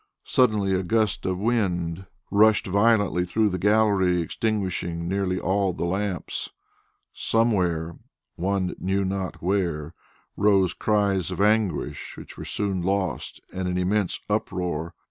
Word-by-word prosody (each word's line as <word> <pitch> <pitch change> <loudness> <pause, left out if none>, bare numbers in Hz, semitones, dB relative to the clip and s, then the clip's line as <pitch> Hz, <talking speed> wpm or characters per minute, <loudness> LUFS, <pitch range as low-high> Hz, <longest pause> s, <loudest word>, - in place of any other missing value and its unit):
Suddenly 105 -6 +2
a 95 - +1
gust 110 +1 0
of 95 -1 0
wind 95 -5 -1 0.2
rushed 105 +1 +5
violently 100 -3 +3
through 105 +4 +1
the 95 -1 -3
gallery, 100 -3 +3
extinguishing 90 -3 -2
nearly 95 0 0
all 95 0 +1
the 85 - -3
lamps. 95 0 -2 0.6
Somewhere, 90 -8 0 0.4
one 95 +1 -1
knew 95 +1 0
not 95 -2 -3
where, 85 -5 -1 0.4
rose 95 -3 +3
cries 100 -4 +1
of 90 - -5
anguish 105 -5 0
which - - -10
were - - -8
soon 100 -3 -1
lost 95 0 -2
in 95 0 -2
an 90 0 -1
immense 95 +1 0
uproar. 85 -3 -2
95 Hz, 125 wpm, -25 LUFS, 90-105 Hz, 0.6 s, rushed